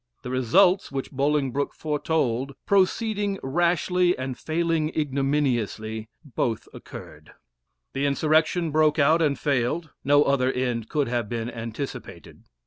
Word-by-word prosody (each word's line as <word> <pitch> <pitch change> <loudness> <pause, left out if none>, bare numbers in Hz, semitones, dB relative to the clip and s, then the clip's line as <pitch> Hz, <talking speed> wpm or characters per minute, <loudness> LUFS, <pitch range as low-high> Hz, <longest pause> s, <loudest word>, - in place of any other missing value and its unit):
The 125 - -5
results 175 - +3
which 135 -1 -4
Bolingbroke 140 0 0
foretold 140 -4 -1
proceeding 200 +1 +1
rashly 175 +4 +1
and 130 0 -4
failing 165 0 -1
ignominiously 130 -7 -1 0.2
both 120 -4 -2
occurred. - - -11 0.6
The 140 +1 0
insurrection 155 +3 +2
broke 155 0 +3
out, 155 +3 +4
and 145 -3 +2
failed 145 +3 -1
no 145 +1 +5
other 130 -2 +2
end 120 -4 -2
could 145 -2 0
have 120 -3 -2
been 120 0 -3
anticipated. 115 +4 -7
140 Hz, 120 wpm, -25 LUFS, 125-160 Hz, 0.6 s, no